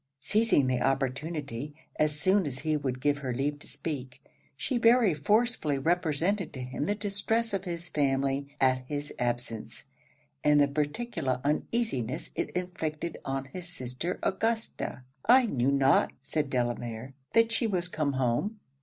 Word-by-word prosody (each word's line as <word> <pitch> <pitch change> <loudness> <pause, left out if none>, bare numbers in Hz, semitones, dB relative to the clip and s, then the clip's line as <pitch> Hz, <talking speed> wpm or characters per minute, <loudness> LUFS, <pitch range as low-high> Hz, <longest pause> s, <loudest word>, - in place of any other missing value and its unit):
Seizing 205 - +3
the 130 -1 +1
opportunity, 140 0 -1 0.2
as 150 -1 +1
soon 190 +1 +3
as 130 -1 -5
he 155 0 +1
would 130 -4 -2
give 145 +1 +2
her 130 -4 -3
leave 145 +3 -1
to - - -10
speak, 130 -5 -5 0.4
she 245 - 0
very 230 -4 +5
forcibly 205 - +2
represented 170 +4 +1
to 130 - -6
him 130 +3 -3
the 205 - +1
distress 210 +2 0
of 195 0 -1
his 175 -1 -4
family 140 -2 +1
at 130 -1 +4
his 145 +1 -4
absence, 120 -2 -3 0.6
and 150 0 +5
the 145 - +5
particular 145 - -1
uneasiness 150 - -1
it - - -2
inflicted 170 -3 -3
on 135 0 -2
his 180 -1 -6
sister 130 +2 -4
Augusta. 225 - -1 0.2
'I 255 +1 +7
knew 135 - +1
not,' 135 0 +4
said 145 0 -1
Delamere, 120 0 -2 0.2
'that 230 0 +5
she 230 0 +1
was 180 -4 0
come 155 -5 -1
home.' 130 - 0
150 Hz, 150 wpm, -29 LUFS, 135-185 Hz, 0.6 s, I